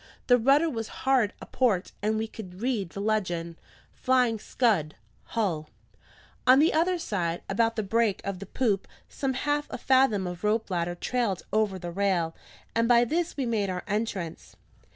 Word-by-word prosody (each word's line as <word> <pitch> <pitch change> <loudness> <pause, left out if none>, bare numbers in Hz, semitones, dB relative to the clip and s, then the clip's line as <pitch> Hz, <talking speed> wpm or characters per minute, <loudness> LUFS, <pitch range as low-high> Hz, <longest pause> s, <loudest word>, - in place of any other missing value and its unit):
The 245 -1 +5
rudder 275 +7 +4
was 225 -7 -3 0.2
hard 260 -6 +3
aport, 220 -8 0
and 215 +1 +1
we 220 - -1
could 185 -5 -10
read 225 -6 -1
the 195 - -8
legend: 175 -6 -1 0.4
FLYING 250 -3 +2
SCUD 200 - +1 0.3
HULL 170 -9 -2 0.8
On 255 +1 +8
the 310 +4 +4
other 350 +3 +2
side, 175 - -2
about 225 +3 +1
the 215 - -1
break 220 0 +1
of 200 -2 -3
the 200 - -8
poop, 210 -4 0 0.2
some 265 -2 -2
half 290 +2 0
a - - -5
fathom 260 -7 +3
of 180 +1 -6
rope 215 0 0
ladder 175 0 -1
trailed 220 -1 -1
over 215 -3 +1
the 175 -1 -6
rail, 175 -3 0 0.4
and 230 0 +2
by 240 0 +5
this 335 +6 -1
we 270 - 0
made 215 -4 0
our 180 -1 -3
entrance. 205 -5 -3
215 Hz, 170 wpm, -27 LUFS, 185-250 Hz, 0.8 s, On